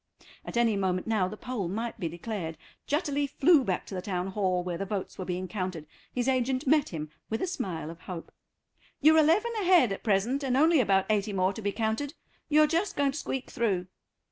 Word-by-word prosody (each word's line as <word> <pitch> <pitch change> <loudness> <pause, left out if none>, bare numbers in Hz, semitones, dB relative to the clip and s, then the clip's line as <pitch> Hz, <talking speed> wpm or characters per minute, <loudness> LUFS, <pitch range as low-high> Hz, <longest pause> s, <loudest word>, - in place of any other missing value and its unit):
At - - -5
any 230 -3 +3
moment 185 -2 0
now 215 -5 +1
the 215 - -7
poll 245 -7 -3
might 225 +5 -4
be 170 -4 -2
declared. 170 -1 -5 0.3
Jutterly 290 -1 0
flew 285 +1 +4
back 190 -6 -1
to - - -9
the 185 - -3
Town 180 -1 -2
Hall, 185 -2 0
where 175 -1 -4
the - - -1
votes 195 -1 -4
were 185 - -3
being 185 +1 -3
counted. 180 -4 -4 0.3
His 250 0 -1
agent 260 +1 +1
met 295 +1 +3
him 155 -3 -5 0.2
with 225 - -1
a - - 0
smile 185 - -4
of 165 - -12
hope. 175 -3 -7 0.7
"You're 315 +2 +6
eleven 340 +10 +3
ahead 350 - +5
at 195 - -4
present, 225 +6 +1
and 260 -1 +1
only 320 +2 +5
about 195 -5 +3
eighty 205 0 0
more 185 0 +1
to 220 - -7
be 205 -1 0
counted; 230 +8 -2 0.3
you're 305 0 +6
just 335 +6 0
going 280 -1 +3
to 275 - -6
squeak 265 -2 -4
through." 195 -6 0
220 Hz, 210 wpm, -28 LUFS, 185-275 Hz, 0.7 s, You're